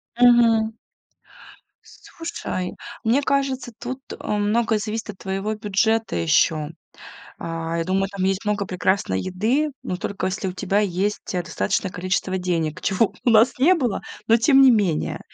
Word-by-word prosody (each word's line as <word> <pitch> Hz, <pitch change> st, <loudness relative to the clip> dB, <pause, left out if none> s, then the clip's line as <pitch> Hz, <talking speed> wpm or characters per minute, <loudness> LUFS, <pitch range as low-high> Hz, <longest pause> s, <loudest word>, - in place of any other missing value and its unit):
Мгм. 230 Hz, -2 st, +5 dB, 1.1 s
Слушай, 330 Hz, -, -6 dB, 0.3 s
мне 235 Hz, +5 st, +3 dB
кажется, 275 Hz, -3 st, -1 dB
тут, 255 Hz, +2 st, -5 dB
э, -, -, -7 dB
многое 215 Hz, +2 st, +1 dB
зависит 215 Hz, +1 st, -4 dB
от 195 Hz, -, -18 dB
твоего 195 Hz, +2 st, -3 dB
бюджета 220 Hz, +2 st, 0 dB
ещё. 150 Hz, -, +2 dB, 0.7 s
А, 165 Hz, 0 st, -4 dB
я 165 Hz, -, -1 dB
думаю, 190 Hz, +2 st, 0 dB
там 195 Hz, -1 st, -3 dB
есть 195 Hz, +1 st, 0 dB
много 210 Hz, -1 st, -1 dB
прекрасной 185 Hz, -, 0 dB
еды, 230 Hz, +12 st, 0 dB
но 180 Hz, -, -3 dB
только 195 Hz, +1 st, -3 dB
если 190 Hz, +1 st, -2 dB
у -, -, -4 dB
тебя 195 Hz, +2 st, 0 dB
есть, 200 Hz, +1 st, -2 dB
э, 180 Hz, -, 0 dB
достаточное 185 Hz, +3 st, -1 dB
количество 185 Hz, +1 st, -2 dB
денег, 165 Hz, -4 st, -2 dB
чего 195 Hz, +2 st, +1 dB
у 245 Hz, -, +4 dB
нас 225 Hz, +2 st, +5 dB
не 330 Hz, +8 st, +5 dB
было, 250 Hz, -, -1 dB, 0.3 s
но 225 Hz, -, +5 dB
тем 270 Hz, +4 st, +5 dB
не 265 Hz, -1 st, +8 dB
менее. 200 Hz, -9 st, +1 dB
205 Hz, 155 wpm, -22 LUFS, 185-230 Hz, 1.1 s, не